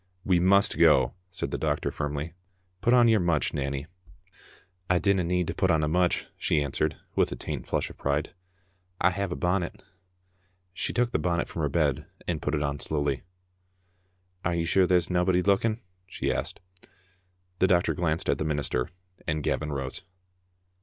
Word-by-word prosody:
" 90 - -36
We 90 -2 +4
must 100 +3 +4
go, - - +5
" 90 - -43
said 85 - -3
the - - -2
doctor 75 -2 0
firmly. 75 +2 -3 0.2
" 95 0 -43
Put 120 - +2
on 120 -1 +6
your 110 -2 +5
mutch, 85 -4 +1
Nanny." 70 -1 -2 0.6
" 90 0 -27
I 90 - +4
dinna 100 0 +2
need 90 +1 +1
to - - -1
put 95 +1 +1
on 80 -2 +3
a - - +1
mutch," 90 +2 +1
she 80 - +2
answered, 75 +2 -1 0.2
with - - +2
a - - -3
faint 75 -6 -5
flush - - 0
of - - -16
pride. 70 +1 -1 0.3
" 90 0 -42
I 95 - +4
have 100 0 -2
a - - -1
bonnet. 90 -1 -1 0.5
" 90 0 -42
She - - -2
took 120 0 +1
the - - +1
bonnet 85 +2 0
from 85 - -5
her 75 - +1
bed, 75 -3 0 0.2
and 80 -3 -1
put 75 - -1
it 75 - 0
on 70 0 -2
slowly. 70 -3 -1 0.6
" 90 0 -42
Are 85 0 0
you 85 -1 0
sure 90 +2 +3
there's 90 -1 +3
naebody 90 0 +2
looking?" 110 +3 +2 0.3
she 95 - -1
asked. - - -3 1.0
The 95 - +5
doctor 90 -1 +3
glanced 85 -2 -1
at - - +1
the - - 0
minister, 70 -4 -1 0.4
and 75 -2 -1
Gavin 75 -1 -1
rose. 70 -2 -4
90 Hz, 195 wpm, -27 LUFS, 75-90 Hz, 1.0 s, on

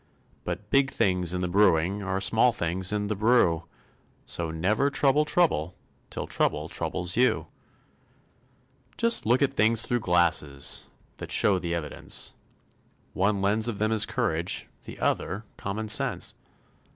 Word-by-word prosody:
But 100 +4 -6
big 135 0 +3
things 90 -8 0
in 90 0 -2
the 90 - -1
brewing 95 0 +2
Are 95 -1 -2
small 115 +5 +4
things 90 -3 -2
in 105 -1 -1
the 105 +1 -2
brew; 105 -6 +3 0.6
So 85 -1 0
never 100 - 0
trouble 145 +1 +2
trouble 150 - +1 0.3
Till - - -5
trouble - - -1
troubles 90 0 -3
you. 125 +2 +2 1.5
Just 230 - +2
look 125 +4 +3
at 135 -1 0
things 115 -2 +3
through 120 - -1
glasses 85 -7 0 0.3
That - - -8
show 95 -3 +2
the 85 -1 -3
evidence; 75 -4 -4 0.8
One 100 +1 0
lens 110 +3 +3
of 115 -4 -3
them 110 +1 0
is 110 -1 +4
courage, 95 -8 -2 0.2
The - - -10
other 100 +4 -2
common 105 +3 -4
sense. 110 - +3
100 Hz, 140 wpm, -26 LUFS, 90-115 Hz, 1.5 s, small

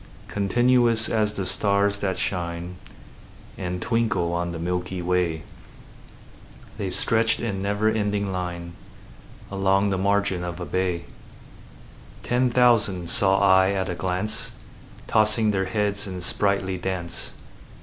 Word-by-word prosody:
Continuous 120 +2 +2
as 105 -1 +1
the 100 -3 -4
stars 100 +1 +2
that 95 -2 -2
shine 85 0 -4 0.8
And 90 -1 -4
twinkle 110 -7 0
on 85 0 -2
the 85 - -5
milky 90 +2 -3
way, 85 -3 -1 1.4
The 100 -2 -2
stretched 115 +5 +4
in 105 -5 -3
never 105 +2 0
ending 105 -2 0
line 90 -2 -5 0.8
Along 100 +1 +1
the 95 - -1
margin 100 -2 0
of 90 0 -5
a 90 - -4
bay: 90 -2 -1 1.2
Ten 125 +1 +1
thousand 110 -8 +2
saw 95 0 +3
I 95 0 +4
at 95 -1 -2
a - - -2
glance, 95 +5 -2 0.5
Tossing 110 0 +3
their 95 -1 0
heads 100 +1 -1
in 95 -1 -6
sprightly 95 0 0
dance. 90 -2 -3
95 Hz, 125 wpm, -24 LUFS, 90-105 Hz, 1.4 s, stretched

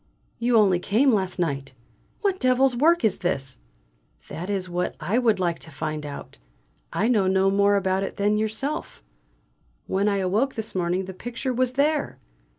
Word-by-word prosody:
You 235 0 +3
only 195 -5 +4
came 230 +9 +3
last 190 -3 -1
night. 140 -6 -2 0.5
What 390 -2 0
devil's 255 0 +3
work 325 +3 +3
is 210 - +1
this?" 135 - -2 0.7
"That 180 +4 -6
is 195 -2 -2
what 180 0 -2
I 195 +10 0
would 225 -6 +2
like 170 -2 0
to - - -10
find 150 0 -4
out; 140 - -9 0.5
I 215 - 0
know 210 -6 +3
no 190 +1 +3
more 200 +1 +3
about 190 -1 +1
it 195 - -4
than 205 +1 +2
you 215 +1 +1
yourself. 270 - -4 0.8
When 195 +2 0
I 200 -1 +2
awoke 205 +8 0
this 220 -1 -5
morning 180 +1 -1
the 190 - -7
picture 245 +6 -4
was 250 0 0
there!" 290 +2 0
200 Hz, 175 wpm, -24 LUFS, 180-245 Hz, 0.8 s, only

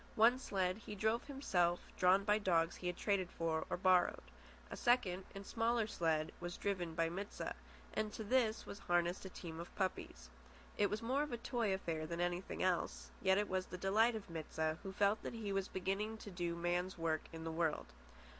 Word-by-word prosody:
One 235 +4 +6
sled 190 -6 0
he 210 -1 -7
drove 220 +4 +1
himself, 180 -11 +1 0.2
drawn 185 +2 +5
by 210 +1 +3
dogs 170 -5 +2
he 180 - -4
had 180 - -2
traded 195 -4 +1
for 165 -2 -1
or - - -1
borrowed. 185 -1 +4 0.5
A - - -3
second 195 -7 +2
and 195 0 -7
smaller 230 +1 +1
sled 160 -6 0
was 175 0 -5
driven 180 -5 -2
by 165 0 +2
Mit 195 +5 -4
sah, - - -4 0.4
and 215 -1 -1
to 220 - -4
this 225 0 +2
was 200 - -7
harnessed 175 +1 +1
a - - -5
team 165 -3 -7
of 170 - -8
puppies. 65 - -3 0.4
It 205 - +3
was 215 +2 -2
more 260 +5 +1
of 295 - -2
a 240 - -1
toy 235 -3 0
affair 165 -5 -2
than 170 +1 -4
anything 175 +1 -1
else, 185 -2 0
yet 190 0 +4
it 205 0 +1
was 185 0 -1
the 180 - -6
delight 215 +5 +3
of 215 -2 -6
Mit 165 -3 -6
sah, 160 0 +1
who 195 - -5
felt 205 +2 +2
that - - -5
he 210 -3 -3
was 195 -1 0
beginning 195 +4 -2
to 205 - -9
do 175 -1 -2
a - - -8
man's 175 +2 0
work 160 -2 0
in 160 0 -7
the 165 - -3
world. 160 - -1
190 Hz, 210 wpm, -38 LUFS, 170-210 Hz, 0.5 s, One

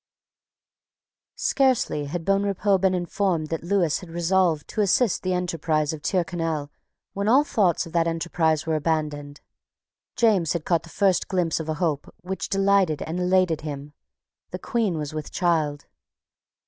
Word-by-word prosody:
Scarcely 255 - +1
had 165 +3 -5
Bonrepaux 195 0 +2
been 190 0 +2
informed 175 -3 -1
that 165 - -3
Lewis 175 -4 +1
had 180 - -11
resolved 170 -2 +1
to 215 - -1
assist 210 +2 +2
the 185 0 -1
enterprise 160 -3 -1
of 155 - -7
Tyrconnel 165 -4 -1 0.4
when 200 +1 -2
all 260 +6 +5
thoughts 195 - +1
of 165 - -12
that 170 -1 +2
enterprise 165 -1 0
were 160 - -1
abandoned. 150 -2 -2 0.7
James 205 -8 +3
had 170 -3 -4
caught 170 -2 +2
the 165 - -14
first 195 0 +1
glimpse 175 -4 0
of 160 0 -5
a 155 - -1
hope 155 -3 -2
which 190 +2 -4
delighted 195 -5 +2
and 165 +3 -4
elated 180 -2 +2
him. 145 -1 -7 0.6
The - - -5
Queen 215 -8 -1
was 150 -1 -4
with 155 -1 -5
child. 155 -5 0
170 Hz, 150 wpm, -24 LUFS, 155-190 Hz, 0.7 s, all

